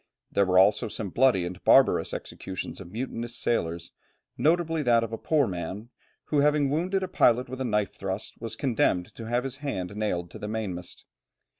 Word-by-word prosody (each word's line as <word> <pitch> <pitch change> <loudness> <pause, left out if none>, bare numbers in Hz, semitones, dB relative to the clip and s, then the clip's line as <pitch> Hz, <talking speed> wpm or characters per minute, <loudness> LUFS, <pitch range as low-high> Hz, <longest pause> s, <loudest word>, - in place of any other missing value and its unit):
There 100 -1 +2
were 90 0 +3
also 105 +5 +5
some 105 -2 -5
bloody 120 -7 +3
and 90 +1 -7
barbarous - - +5
executions 95 -1 -6
of 90 -2 -11
mutinous 120 0 -4
sailors, 85 -9 -1 0.4
notably 165 0 +2
that 120 -4 +3
of 115 0 -5
a - - -2
poor 150 -3 +2
man, 95 +4 -5 0.4
who 150 - +1
having 145 -1 +3
wounded 185 +5 0
a - - -2
pilot 125 -8 +3
with 130 +1 -6
a - - 0
knife 105 -3 0
thrust, 95 +2 -5
was 115 -1 -3
condemned 110 -9 0
to 115 - -8
have 120 +2 0
his 135 -1 -5
hand 100 -10 -4
nailed 90 -5 -2
to - - -9
the 105 - -5
mainmast. 100 -5 -5
115 Hz, 185 wpm, -27 LUFS, 95-135 Hz, 0.4 s, also